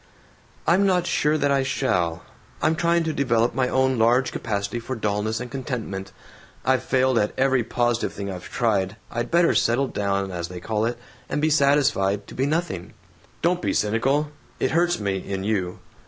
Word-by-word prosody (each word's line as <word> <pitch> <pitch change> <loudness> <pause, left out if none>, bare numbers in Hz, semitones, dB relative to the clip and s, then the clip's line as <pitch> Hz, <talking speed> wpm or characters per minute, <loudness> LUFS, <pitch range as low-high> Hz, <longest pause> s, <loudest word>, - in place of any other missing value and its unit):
"I'm 195 +4 +4
not 180 -2 +2
sure 150 -2 +2
that 145 -2 +1
I 140 -1 +3
shall. 90 -11 0 0.4
I'm 160 - +2
trying 170 +1 +2
to 160 -1 -1
develop 120 -4 +1
my 130 -1 +1
own 130 -2 +2
large 120 +3 +3
capacity 105 +1 -3
for 130 +3 -5
dullness 105 0 -1
and 125 0 -6
contentment. 115 -8 -4 0.5
I've 130 -1 +3
failed 130 -1 +2
at 105 - -1
every 130 -2 +3
positive 120 +1 0
thing 100 0 -6
I've 90 -1 -8
tried. 100 -4 0 0.2
I'd 120 0 -2
better 170 0 +4
'settle 130 +3 +2
down,' 100 -1 -1
as 85 -1 -4
they 90 0 -8
call 110 +4 -1
it, 120 +1 -2 0.3
and - - -1
be 155 +1 +2
satisfied 140 -9 +2
to - - -12
be 135 +2 0
nothing." 155 - -2 0.5
"Don't 175 +1 +2
be - - 0
cynical. 135 +8 +1 0.3
It - - +1
hurts 175 -1 +2
me, 100 -2 -1
in 95 0 -4
you. 95 -4 -1
120 Hz, 180 wpm, -24 LUFS, 100-140 Hz, 0.5 s, I'm